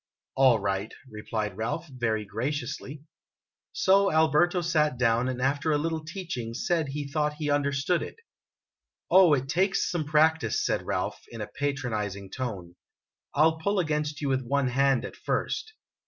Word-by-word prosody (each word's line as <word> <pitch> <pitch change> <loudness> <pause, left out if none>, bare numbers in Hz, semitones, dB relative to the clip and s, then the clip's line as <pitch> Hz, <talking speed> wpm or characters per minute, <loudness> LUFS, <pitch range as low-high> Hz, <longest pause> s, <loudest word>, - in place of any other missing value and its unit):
"All 130 -3 +5
right," 100 +1 -2 0.2
replied 105 -2 -4
Ralph, 120 +9 -3
very 115 -6 -2
graciously. 140 +5 -4 0.7
So 195 +1 +3
Alberto 160 +3 +3
sat 155 -5 +1
down, 120 0 +2
and 125 -1 -3
after 140 +4 +1
a 150 - +3
little 160 +1 -2
teaching 155 - -5
said 165 +3 0
he 145 +1 -4
thought 150 +1 -1
he 150 -1 -2
understood 145 +4 +1
it. - - -6 0.5
" - - -43
Oh, 185 -5 +7
it 135 -1 -3
takes 190 +7 +1
some 170 -4 -1
practice," 155 +2 +2
said - - -1
Ralph, - - -2
in 115 - -9
a 105 - -3
patronizing 110 -9 -3
tone; 100 -9 -5 0.6
"I 150 - +5
'11 160 0 +3
pull 200 0 +1
against 150 -3 -1
you 145 - -1
with 130 -1 +1
one 135 +1 0
hand, 135 0 +2
at - - -8
first." 440 - -2
140 Hz, 160 wpm, -27 LUFS, 120-160 Hz, 0.7 s, Oh